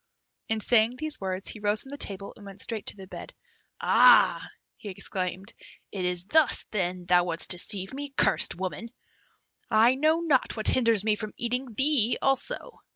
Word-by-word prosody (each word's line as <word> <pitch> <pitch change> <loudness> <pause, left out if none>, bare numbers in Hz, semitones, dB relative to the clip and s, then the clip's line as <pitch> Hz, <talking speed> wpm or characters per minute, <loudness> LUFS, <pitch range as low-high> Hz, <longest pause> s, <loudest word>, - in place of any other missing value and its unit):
In 220 -1 -1
saying 230 +1 +3
these 310 0 -4
words, 190 0 -4
he 215 - -7
rose 210 +1 0
from 265 - -13
the 285 - -7
table 195 0 -4
and 210 - -15
went 200 0 -11
straight 220 0 -3
to - - -4
the 190 - -10
bed 185 - -10 0.4
"Ah!" - - +5 0.3
he 210 - -9
exclaimed, 190 +1 -5 0.4
"it 190 -3 -4
is 180 0 -2
thus, 305 +5 +3
then, 180 -3 -2
thou 175 0 +3
wouldst 170 -1 -3
deceive 190 +2 -3
me, 285 +1 -6
cursed - - +3
woman! 190 +5 -5 0.8
I 225 +3 +5
know 310 +4 +2
not 290 -8 +1
what 215 - +4
hinders 230 -5 +2
me 215 -1 +2
from 215 0 -7
eating 245 0 -3
thee 265 -4 +3
also! 270 - -2
215 Hz, 175 wpm, -27 LUFS, 190-250 Hz, 0.8 s, Ah